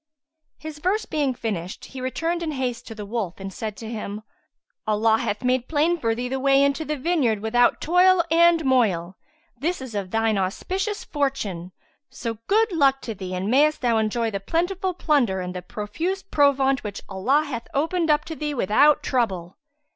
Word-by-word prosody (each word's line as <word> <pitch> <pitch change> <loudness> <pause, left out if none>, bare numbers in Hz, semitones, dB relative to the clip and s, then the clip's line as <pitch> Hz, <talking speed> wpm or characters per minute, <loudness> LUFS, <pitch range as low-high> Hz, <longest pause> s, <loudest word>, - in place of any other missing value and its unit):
His 310 -1 -8
verse 385 +7 0
being 285 -4 -1
finished 195 -5 -4
he 265 - -9
returned 330 +7 -2
in 320 -2 -2
haste 250 -3 -3
to 225 - -8
the 210 -1 -7
wolf 200 -4 -4
and 195 0 -6
said 215 0 -5
to 225 - -8
him, 215 -2 -5 0.6
"Allah 220 +1 +3
hath 205 +3 -2
made 250 0 +1
plain 320 +3 +1
for 230 -5 0
thee 245 +2 -3
the 265 +1 -2
way 275 +1 +4
into 280 +3 +1
the 300 -1 -3
vineyard 265 -8 +1
without 240 +3 +2
toil 360 +1 +4
and 335 -1 +5
moil. 195 -9 +2 0.4
This 345 +5 -1
is 260 -3 -8
of 200 -3 -3
thine 225 0 +1
auspicious 380 - -2
fortune; 210 - -2 0.4
so 230 -3 -5
good 435 +1 +3
luck 275 -5 +3
to 225 - -5
thee 185 -2 -6
and 190 +4 -2
mayest 300 +4 +3
thou 235 -3 +2
enjoy 225 +1 0
the 200 - -3
plentiful 355 - -1
plunder 270 - +1
and 180 0 -4
the 180 - -5
profuse 305 - -4
provaunt 275 -5 +2
which 205 -2 -6
Allah 250 +11 +1
hath 245 -6 -6
opened 325 +3 0
up 300 0 +3
to 320 - -6
thee 300 -1 -3
without 275 +7 +4
trouble!" 195 - -1
255 Hz, 185 wpm, -24 LUFS, 215-310 Hz, 0.6 s, and